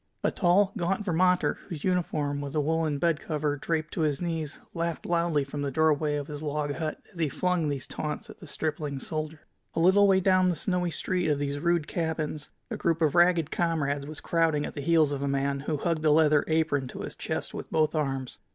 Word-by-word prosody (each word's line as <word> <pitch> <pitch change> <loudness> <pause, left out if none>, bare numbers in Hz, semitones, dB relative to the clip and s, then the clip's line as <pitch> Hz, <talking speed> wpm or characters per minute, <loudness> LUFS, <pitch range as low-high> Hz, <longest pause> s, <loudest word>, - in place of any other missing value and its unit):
A - - +2
tall, 195 +2 +3
gaunt 195 +4 -1
Vermonter, 180 0 +2
whose 155 -4 -6
uniform 155 -6 0
was 140 +1 -5
a - - +2
woolen 155 -1 0
bedcover 155 -2 0
draped 160 -2 -2
to - - -2
his 150 -3 +1
knees, 165 -4 -3
laughed 170 -1 -3
loudly 170 -4 +1
from 140 +1 -5
the 140 - -1
doorway 150 0 +2
of 145 -1 -2
his 145 0 -7
log 150 -1 -2
hut 155 0 -3
as 175 - -12
he 160 -3 +1
flung 180 -1 0
these 140 -3 -3
taunts 150 -1 -4
at - - -12
the 170 - -11
stripling 150 -1 -3
soldier. 155 +1 -4 0.3
A - - 0
little 190 +4 +6
way 190 -1 +5
down 185 -1 +4
the 175 - 0
snowy 180 +1 -1
street 180 0 -1
of 145 - +2
these 145 0 -2
rude 170 0 +1
cabins 155 -3 -3 0.2
a - - -2
group 165 -1 +1
of 155 -4 +2
ragged 175 -3 +4
comrades 145 -5 0
was 155 -1 -8
crowding 165 -3 +1
at - - -6
the 145 - -5
heels 160 -1 +3
of 140 -1 -2
a 140 - -1
man 140 0 0
who 150 +2 -2
hugged 160 +1 -1
a 155 - +4
leather 150 -1 +5
apron 155 -4 +1
to - - -7
his - - -6
chest - - -4
with - - -6
both 155 -1 +2
arms. 135 -4 -2
155 Hz, 215 wpm, -28 LUFS, 145-170 Hz, 0.3 s, little